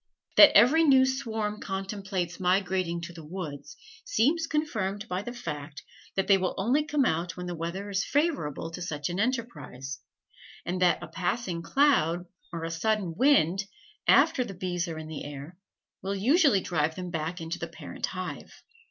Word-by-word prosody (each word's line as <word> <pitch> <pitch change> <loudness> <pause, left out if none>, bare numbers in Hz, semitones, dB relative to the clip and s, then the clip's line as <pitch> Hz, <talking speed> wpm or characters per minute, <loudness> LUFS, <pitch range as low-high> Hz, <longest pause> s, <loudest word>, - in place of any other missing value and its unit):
That 305 - +9
every 265 +10 +6
new 265 -4 +6
swarm 225 -5 -2
contemplates 190 -3 -4
migrating 185 -2 +1
to 170 +1 -7
the 165 -2 -10
woods, 150 -4 -7 0.3
seems 325 - +1
confirmed 215 -10 -2
by 180 -1 -2
the 240 - -6
fact 150 -10 -7 0.3
that 195 - +1
they 195 -1 +5
will 185 -1 -1
only 245 +10 +2
come 295 -3 +1
out 170 -2 -1
when 180 - -5
the 175 - -4
weather 170 +4 -4
is 195 -1 0
favorable 260 - -1
to 170 - -7
such 150 -4 -3
an 175 +2 -3
enterprise, 155 - -3 0.7
and 180 +1 -2
that 175 -3 +3
a - - -6
passing 180 -1 -2
cloud 175 - +2 0.3
or 165 -1 -5
a 165 - -3
sudden 195 0 0
wind, 195 - +3 0.4
after 255 - +5
the 195 -5 -8
bees 175 -1 -2
are 165 -2 -5
in 160 - -6
the 155 -2 -6
air, 145 +4 -8 0.5
will 195 +1 -2
usually 265 - +4
drive 160 -3 0
them 180 -1 -6
back 165 +2 -3
into 165 +1 -5
the - - -4
parent - - -6
hive. - - -6
185 Hz, 170 wpm, -28 LUFS, 165-230 Hz, 0.7 s, That